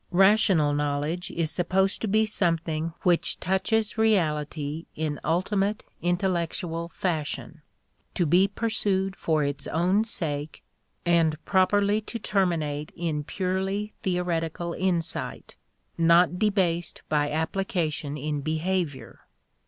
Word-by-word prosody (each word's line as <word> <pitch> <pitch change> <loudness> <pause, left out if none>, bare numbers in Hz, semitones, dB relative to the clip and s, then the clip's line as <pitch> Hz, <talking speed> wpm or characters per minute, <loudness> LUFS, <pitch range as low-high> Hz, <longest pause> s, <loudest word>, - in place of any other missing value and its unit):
Rational 190 -5 +4
knowledge 150 +4 -1
is 165 -2 -1
supposed 190 +4 +1
to 220 - -1
be 215 +2 +3
something 165 -5 0
which 175 -2 +2
touches 215 +4 0
reality 155 -7 0
in 155 -2 -2
ultimate, 195 +5 0 0.2
intellectual 175 -2 -1
fashion; 160 -2 -3 0.5
to 175 - +2
be 180 +5 +4
pursued 200 -3 0
for 155 -5 +1
its 140 0 -2
own 180 +6 +2
sake 155 -9 -3 0.4
and 165 -2 +3
properly 205 +2 +3
to 230 - -6
terminate 165 -9 -1
in 160 -3 -2
purely 190 +4 -2
theoretical 170 -2 -1
insight, 175 -3 -2 0.4
not 170 +2 +4
debased 185 -5 0
by 145 -1 +1
application 160 -2 -2
in 150 0 -2
behavior. 160 0 -3
175 Hz, 105 wpm, -26 LUFS, 155-190 Hz, 0.5 s, Rational